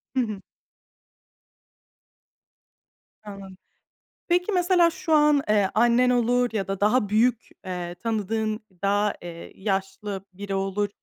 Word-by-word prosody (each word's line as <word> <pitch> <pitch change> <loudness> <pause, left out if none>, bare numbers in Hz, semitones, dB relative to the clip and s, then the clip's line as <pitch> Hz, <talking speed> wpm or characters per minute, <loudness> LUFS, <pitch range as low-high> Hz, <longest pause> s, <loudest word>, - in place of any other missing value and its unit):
Hı - - +2
hı. 215 -4 -4 2.8
Anladım. 195 -2 -10 0.7
Peki, 355 +4 +1
mesela 355 -2 +4
şu 370 -2 -4
an, 295 -2 +5
eee, 205 -2 +3
annen 240 +3 +4
olur 245 0 +2
ya 200 -3 -2
da 195 -1 -3
daha 210 +1 +2
büyük, 230 +3 +1 0.2
eee, 180 -1 -5
tanıdığın, 220 +2 -2 0.2
daha, 205 +1 +1
eee, 170 -1 -9
yaşlı 195 0 -3
biri 200 +1 -6
olur, 195 +1 -1
210 Hz, 115 wpm, -25 LUFS, 195-245 Hz, 2.8 s, an